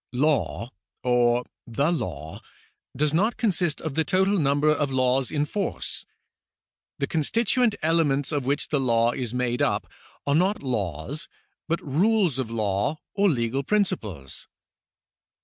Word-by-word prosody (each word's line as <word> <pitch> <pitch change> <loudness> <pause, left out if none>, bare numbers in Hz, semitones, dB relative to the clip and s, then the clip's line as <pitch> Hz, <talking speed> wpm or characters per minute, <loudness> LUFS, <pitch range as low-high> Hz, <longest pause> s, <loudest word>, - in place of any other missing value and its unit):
Law 135 -3 0 0.3
or 120 -1 +3 0.2
the 140 +8 +1
law 80 - -4 0.6
does 150 0 +1
not 210 +8 +2
consist 175 - +1
of 160 -3 -4
the 160 - +1
total 190 +3 +2
number 145 0 +2
of 145 -2 +1
laws 130 0 +2
in 150 -1 0
force. 195 +5 -4 0.9
The 140 - 0
constituent 225 - +1
elements 155 -4 +2
of 145 -3 0
which 140 +1 0
the 150 - +1
law 120 -2 +3
is 120 -2 -4
made 125 -1 0
up - - +1 0.4
are 140 - +1
not 185 +3 +2
laws 110 - -3 0.4
but 170 +1 -1
rules 175 - +2
of 125 -4 -2
law 105 +4 0 0.2
or 200 0 +3
legal 125 -2 0
principles. 140 - -2
140 Hz, 135 wpm, -25 LUFS, 120-165 Hz, 0.9 s, or